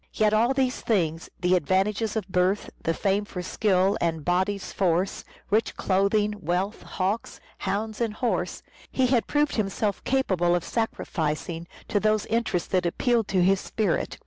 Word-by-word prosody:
Yet 215 -1 +3
all 235 +5 +3
these 260 -2 0
things, 165 -7 0
the 180 0 +3
advantages 195 +6 +1
of 215 -4 -2
birth, 185 +2 +1
the 165 - 0
fame 200 +1 +1
for 185 -3 -6
skill 190 0 +2
and 160 -3 -1
"body's 190 +3 0
force," 185 0 0 0.3
rich 220 +2 +1
clothing, 200 +2 +2
wealth, 185 +3 -1
hawks, 200 +4 -3 0.2
hounds 210 +3 -2
and 225 -3 0
horses, 240 0 -1 0.3
he 260 - +2
had 245 -2 +2
proved 295 -2 +1
himself 205 -1 -1
capable 185 -10 +2
of 175 - -1
sacrificing 165 -6 -2 0.2
to 205 - +1
those 215 0 +2
interests 225 -6 -1
that 180 -2 +1
appealed 235 +4 +1
to 185 -2 +2
his 190 +1 +4
spirit. 215 -2 -1
200 Hz, 155 wpm, -26 LUFS, 180-220 Hz, 0.3 s, his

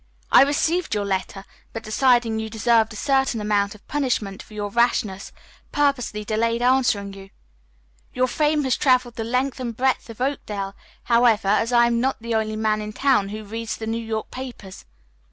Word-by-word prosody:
I - - +8
received 310 +2 +1
your 205 -1 -1
letter, 195 0 -3 0.3
but, 225 - -6
deciding 235 0 +2
you 220 0 -4
deserved 225 0 +2
a - - -9
certain 265 -1 +1
amount 205 0 0
of 210 - -19
punishment 245 -9 -2
for 215 - -14
your 205 -1 -4
rashness, 215 -4 0 0.4
purposely 250 -7 0
delayed 230 +2 0
answering 245 -6 +2
you. 195 0 -12 0.8
Your 255 - +1
fame 300 +2 +1
has 260 -3 +1
traveled 255 -3 +2
the 225 - -3
length 255 +4 -1
and 235 -3 -5
breadth 260 -1 0
of 230 - -10
Oakdale, 210 -7 -3 0.3
however, 235 -4 +3
as 225 +3 +2
I 240 -1 +5
am 235 0 +1
not 265 +1 0
the 230 0 -4
only 215 -1 0
man 215 0 0
in 210 0 -6
town 255 -6 +2
who 215 +1 -6
reads 225 +2 -5
the 220 - -6
New 225 +1 -3
York 220 -1 -4
papers. 245 -7 -9
230 Hz, 180 wpm, -23 LUFS, 210-255 Hz, 0.8 s, I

